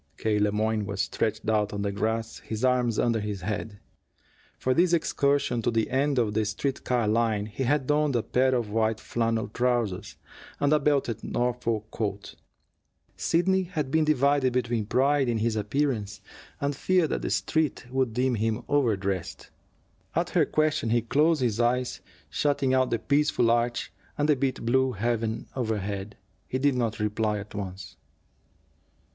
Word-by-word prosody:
K. 105 -1 0
Le 105 0 +2
Moyne 110 0 0
was 100 -1 -5
stretched 110 +2 -2
out 105 -2 +1
on 100 0 -2
the 100 - -1
grass, 110 +3 -2
his 110 +3 -3
arms 125 -3 +2
under 115 -2 +2
his 105 -2 -4
head. 105 +2 -4 0.8
For 130 - +1
this 175 +4 +3
excursion 140 -6 +1
to 115 - +1
the 115 -1 0
end 140 +1 +1
of 110 -4 +1
the 110 +1 +1
street 130 +6 -2
car 120 -3 +1
line 110 -1 +1
he 110 +5 -4
had 140 +1 +1
donned 150 -1 +1
a 115 - +1
pair 130 +1 +2
of 115 -4 -2
white 110 0 +1
flannel 115 -1 -1
trousers 110 -5 -1 0.4
and 145 +1 +3
a 150 - +4
belted 140 -6 0
Norfolk 115 -3 -1
coat. 100 -2 -4 0.8
Sidney 190 +3 +2
had 160 -7 -3
been 160 +1 +3
divided 140 -3 +2
between 120 -4 -1
pride 135 +2 +2
in 115 - +1
his 110 0 0
appearance 105 -2 -1 0.4
and 140 0 -1
fear 180 +3 +2
that - - -2
the - - -2
Street 155 -5 0
would 130 -2 +1
deem 125 +3 +1
him 110 -1 -1
overdressed. 100 -10 -1 0.6
At 170 +2 0
her 165 -5 +3
question 155 -6 +1
he 120 0 +2
closed 150 +4 +2
his 115 -2 0
eyes, 125 +1 0 0.3
shutting 140 -2 0
out 130 -1 +3
the 115 - +1
peaceful 140 -3 +2
arch 120 -2 0 0.2
and 145 - +1
the 150 - +4
bit 130 -1 -1
of - - -8
blue 130 +2 +2
heaven 115 +1 -1
overhead. 105 -4 -3 0.3
He 130 - -2
did 140 +1 +2
not 115 -4 -1
reply 105 0 0
at 105 +1 -8
once. 95 -3 -7
120 Hz, 170 wpm, -27 LUFS, 110-135 Hz, 0.8 s, a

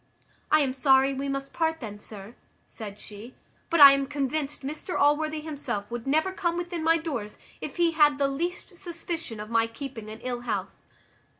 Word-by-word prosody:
"I 310 - +5
am 265 -2 +1
sorry 270 0 +4
we 275 +1 -3
must 275 0 -4
part 320 -1 0
then, 210 -4 -7
sir," 210 +1 -9 0.3
said 205 -3 -9
she; 210 +4 -10 0.3
"but 335 - +2
I 280 -1 +12
am 275 0 0
convinced 285 0 -2
Mr 305 +6 -4
Allworthy 305 +2 +2
himself 285 -9 -4
would 240 +1 -5
never 315 +7 +2
come 345 -2 -1
within 350 -2 -3
my 330 +1 +4
doors, 270 -11 -5 0.2
if - - -6
he 340 -1 +3
had 300 -3 +4
the 280 -1 +2
least 345 +6 -4
suspicion 335 - -5
of 210 +2 -7
my 230 0 +3
keeping 230 -2 -7
an 220 +1 -8
ill 245 -1 -3
house." 210 -5 -4
275 Hz, 185 wpm, -27 LUFS, 235-315 Hz, 0.3 s, I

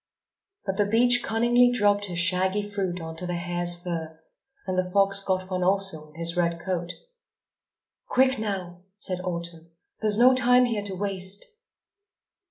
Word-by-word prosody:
But 195 -1 -3
the 205 - +2
beech 245 +3 +4
cunningly 240 +2 +3
dropped 205 -3 +2
his 180 -3 -5
shaggy 185 +4 0
fruit 190 -3 -3
on 160 -1 -7
to 180 - -5
the 175 - -2
hare's 175 0 0
fur; 160 -2 -5 0.5
and 185 -1 -2
the 185 0 -1
fox 195 +1 +3
got 185 -1 -1
one 185 0 -1
also 190 -4 +1
on 150 - -22
his 170 +1 0
red 170 -1 0
coat. 175 -1 -4 1.1
"Quick, 265 - +2
now," 185 -5 -4 0.2
said 185 -3 -3
Autumn. 170 -2 -5 0.3
"There's 210 -1 +2
no 250 +3 +6
time 250 0 +4
here 225 -4 -1
to 195 -2 0
waste." 195 0 -2
190 Hz, 160 wpm, -25 LUFS, 175-205 Hz, 1.1 s, no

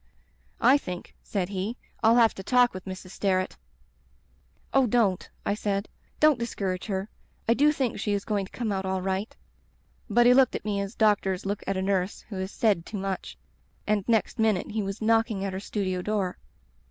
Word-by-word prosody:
I 260 +4 +6
think,' 180 -8 -7
said 190 -3 -2
he, 200 +4 -3 0.2
'I'll 225 0 +5
have 230 -3 +5
to - - -7
talk 245 +4 +4
with 185 0 -8
Mrs. 185 -1 -7
Sterret.' 185 -2 0 1.2
"'Oh, 270 -2 +4
don't,' 210 -5 +1 0.2
I - - +1
said. 205 -1 -1 0.3
'Don't 305 -4 +5
discourage 195 -6 -3
her. 195 -1 -2 0.4
I 230 - +5
do 295 +5 +4
think 265 -6 -1
she 205 - 0
is 200 -1 -2
goiiig 205 -3 0
to - - -16
come 235 -4 -2
out 190 -1 -1
all 190 -1 -2
right.' 190 +3 -2 0.4
" - - -37
But 240 +3 +4
he 245 - +8
looked 260 -1 +4
at - - -5
me 205 -2 0
as 200 +3 -5
doctors 200 -4 +2
look 200 +1 -2
at 195 0 0
a 190 - -1
nurse 190 -1 0
who 200 - -5
has 190 0 -3
said 205 -5 +1
too 210 - -6
much, 195 -1 -4 0.5
and 210 -2 +1
next 230 +1 +1
minute 215 -4 +1
he 215 0 -1
was 195 +2 -4
knocking 225 -3 +2
at 195 - -3
her 190 - -3
studio 190 -2 -2
door. 195 -2 -1
200 Hz, 200 wpm, -27 LUFS, 190-225 Hz, 1.2 s, he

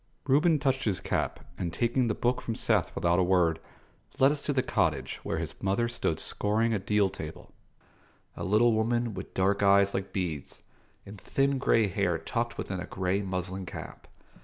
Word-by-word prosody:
Reuben 150 +4 +4
touched 135 -2 0
his 100 -5 0
cap, - - -2 0.2
and, 85 -2 -2
taking 120 +3 +1
the 110 - 0
book 125 +1 0
from 115 - -3
Seth - - +1
without 85 +1 +2
a - - +4
word, 90 -3 +2 0.6
led 135 +2 +5
us 150 -1 -2
to 145 - -1
the 130 -3 +1
cottage, - - 0
where - - -3
his - - -4
mother 100 +5 +1
stood 115 -9 -2
scouring 110 +2 0
a 105 - 0
deal 105 +1 +2
table: 80 -5 -8 0.8
a - - -6
little 110 +4 +4
woman 115 +1 0
with - - -8
dark 100 +2 +2
eyes 100 0 +5
like 95 0 -3
beads, 85 -7 -4 0.4
and 100 0 -11
thin 135 0 +1
grey 115 -4 +3
hair 95 -3 0
tucked 115 +9 -3
within 95 -1 -4
a 90 - -6
grey 95 +1 -1
muslin 95 -1 -4
cap. - - -9
100 Hz, 185 wpm, -29 LUFS, 95-120 Hz, 0.8 s, led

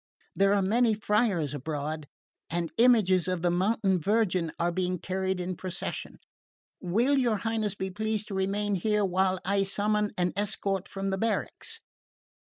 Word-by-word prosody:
There 195 +1 +4
are 200 - +2
many 225 +3 +3
friars 205 - +1
abroad, 150 +1 -4 0.4
and 170 -1 -2
images 210 -7 +5
of 185 -2 -2
the 175 - +3
Mountain 190 +1 +1
Virgin 185 -3 +1
are 170 +1 +1
being 180 +1 -1
carried 190 +1 -2
in 180 0 -3
procession. 185 +1 -5 0.6
Will 235 +10 +2
your 235 -4 +2
Highness 220 -1 -1
be 190 -1 -4
pleased 215 +1 -2
to - - -5
remain 200 +2 0
here 210 +2 +1
while 190 0 +1
I 200 +1 +2
summon 210 +1 +1
an 180 -1 +1
escort 200 -2 -1
from 195 0 -3
the 190 - -1
barracks?" 225 -1 -2
195 Hz, 155 wpm, -28 LUFS, 180-210 Hz, 0.6 s, images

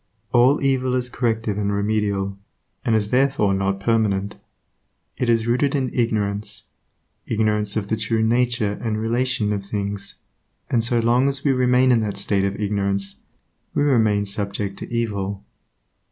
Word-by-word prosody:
All 125 +4 +5
evil 130 -2 +1
is 125 -1 -1
corrective 115 -4 -1
and 100 -1 0
remedial, 100 -1 -1 0.5
and 115 - +2
is 105 -1 0
therefore 130 -6 +2
not 95 0 -1
permanent. 100 -2 0 0.8
It 125 - -1
is 115 -1 +2
rooted 130 +4 +1
in 130 -3 -1
ignorance, 105 -4 0 0.6
ignorance 105 -1 +1
of 100 -2 -2
the 110 - 0
true 110 +1 0
nature 115 -3 +1
and 110 -2 -2
relation 115 -1 0
of 100 -1 -3
things, 100 0 -4 0.6
and 115 -3 +2
so 120 0 +3
long 120 +4 +3
as 140 +1 -5
we 140 - +3
remain 125 0 +3
in 120 - +4
that 105 -3 -3
state 100 -1 +1
of 100 +1 -3
ignorance, 100 -1 0 0.6
we - - +2
remain 110 -7 +2
subject 100 -1 -2
to - - -8
evil. 100 -4 -2
110 Hz, 155 wpm, -22 LUFS, 100-120 Hz, 0.8 s, All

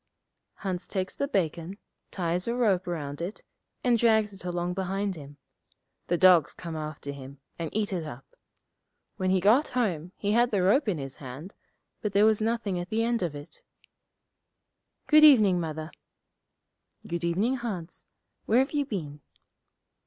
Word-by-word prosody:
Hans 185 -3 -4
takes 190 -2 -3
the 280 - -1
bacon, 175 - -2 0.3
ties 180 +1 -2
a 235 - 0
rope 200 -7 +2
round 145 -4 -4
it, 180 +5 -5 0.4
and 240 -2 +3
drags 220 -3 +3
it 195 - -12
along 175 0 -2
behind 195 +1 -2
him. 145 -2 -11 0.7
The 175 - +1
dogs 180 -4 +5
come 170 -2 -7
after 155 -2 -5
him, 140 0 -10 0.2
and 165 -2 -3
eat 210 -2 -1
it 175 -3 -2
up. 135 -4 -8 0.9
When 185 0 0
he 190 0 +3
got 220 - +4
home 180 -8 -1
he 205 - -1
had 240 +2 +4
the 200 -5 +1
rope 230 +9 +3
in 180 - 0
his 135 -2 -7
hand, 140 - -9 0.5
but 210 -2 -2
there 205 +1 +5
was 220 -1 +3
nothing 220 -4 -1
at 175 - -6
the 225 +1 0
end 235 -1 0
of 170 -5 -2
it. 145 +1 -11 1.4
'Good 305 0 +6
evening, 215 -12 +7
Mother.' 155 -1 -4 1.1
'Good 170 0 -4
evening, 200 +10 +1
Hans. 195 -9 -6 0.4
Where 225 - +3
have 265 +2 +3
you 290 -2 0
been?' 150 - -5
185 Hz, 160 wpm, -28 LUFS, 165-220 Hz, 1.4 s, evening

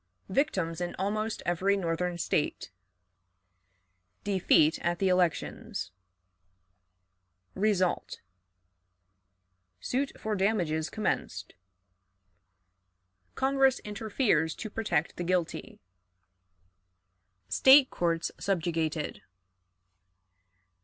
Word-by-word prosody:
Victims 185 - 0
in 175 - -3
almost 215 +3 -2
Every 185 +3 +1
Northern 175 -1 -2
State. 150 - -1 1.5
Defeat 180 -5 +3
at 175 +1 0
the 190 +1 +1
Elections. 180 - -1 1.6
Result. 190 -3 0 1.6
Suit 265 - -1
for 215 -1 -2
Damages 175 -6 0
commenced. 215 - -3 1.8
Congress 270 -1 +3
interferes 205 - 0
to 220 - -7
protect 200 -9 -1
the 175 - -3
Guilty. 175 -1 -2 1.7
State 265 - +6
Courts 170 -1 -1
subjugated. 165 -5 -2
185 Hz, 70 wpm, -29 LUFS, 165-215 Hz, 1.8 s, State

